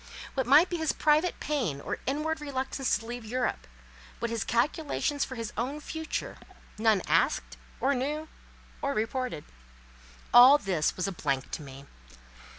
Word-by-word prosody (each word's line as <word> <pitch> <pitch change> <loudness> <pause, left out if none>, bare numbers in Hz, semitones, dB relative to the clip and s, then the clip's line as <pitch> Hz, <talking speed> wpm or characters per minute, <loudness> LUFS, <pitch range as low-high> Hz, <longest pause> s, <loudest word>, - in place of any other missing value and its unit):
What 265 -3 -1
might 300 +7 +7
be 350 - -3
his 320 -2 0
private 310 +3 +2
pain 245 - -1
or - - -4
inward 305 +3 -1
reluctance 270 -3 -1
to 225 - -11
leave 240 0 -6
Europe—what 235 0 -5
his 230 -2 -1
calculations 285 +3 0
for 260 - -5
his 230 -3 -5
own 260 +6 -2
future—none 225 - -3
asked, - - +1 0.2
or 270 +3 +2
knew, 295 +4 -2 0.5
or 280 0 -1
reported. 230 - -2 0.9
All 255 +4 +10
this 185 - -1
was 185 - -1
a - - -2
blank 140 -6 -2
to - - -4
me. 135 -1 -11
255 Hz, 145 wpm, -29 LUFS, 215-295 Hz, 0.9 s, All